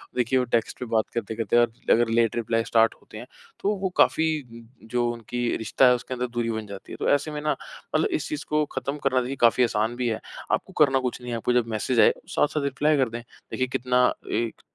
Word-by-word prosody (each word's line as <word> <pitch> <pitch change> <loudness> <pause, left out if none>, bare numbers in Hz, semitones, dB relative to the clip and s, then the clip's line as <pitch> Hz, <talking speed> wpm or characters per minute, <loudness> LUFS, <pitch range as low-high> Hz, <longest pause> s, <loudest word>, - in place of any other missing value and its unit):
देखिए, 125 +1 +2
वो 125 - 0
टेक्स्ट 115 +1 0
पे 125 - -4
बात 110 -1 +1
करते-करते 115 0 -1
आप 120 -1 +4 0.2
अगर 120 0 +4
लेट 115 -1 +2
रिप्लाई 115 -1 0
स्टार्ट 115 -1 +3
होते 110 - -12
हैं, 120 - -8 0.3
तो 205 +1 0
वो 190 - 0
काफ़ी 160 - +4 0.2
म, 115 -1 -12 0.2
जो 120 0 0
उनकी 120 +1 -3
रिश्ता 115 +4 +3
है 125 - +6
उसके 125 - -6
अंदर 125 0 -2
दूरी 120 -1 -2
बन 110 -1 -4
जाती 100 -1 -10
है। - - -5
तो - - 0
ऐसे 145 +2 -3
में 150 0 -4
ना 150 - 0 0.4
मतलब - - +3
इस - - -5
चीज़ 305 - -4
को 150 0 +2
खत्म 140 +2 -3
करना 130 -2 +2
चाहिए। 130 +3 -4
काफ़ी 120 +2 +4
आसान 115 0 0
भी 125 -1 -1
है। 110 0 -2 0.3
आपको - - -1
करना 135 -2 +3
कुछ 125 -1 -3
नहीं 125 0 -6
है। 115 - -1
आपको 125 - 0
जब 120 -2 +2
मैसेज 115 +3 0
आए, - - +6 0.2
साथ-साथ 150 0 +1
रिप्लाई 145 +2 +1
कर 130 -4 +2
दें। 120 +1 -6
देखिए, 130 +2 -5
कितना 125 0 +2 0.2
एक 115 +1 -2
120 Hz, 235 wpm, -25 LUFS, 115-130 Hz, 0.4 s, है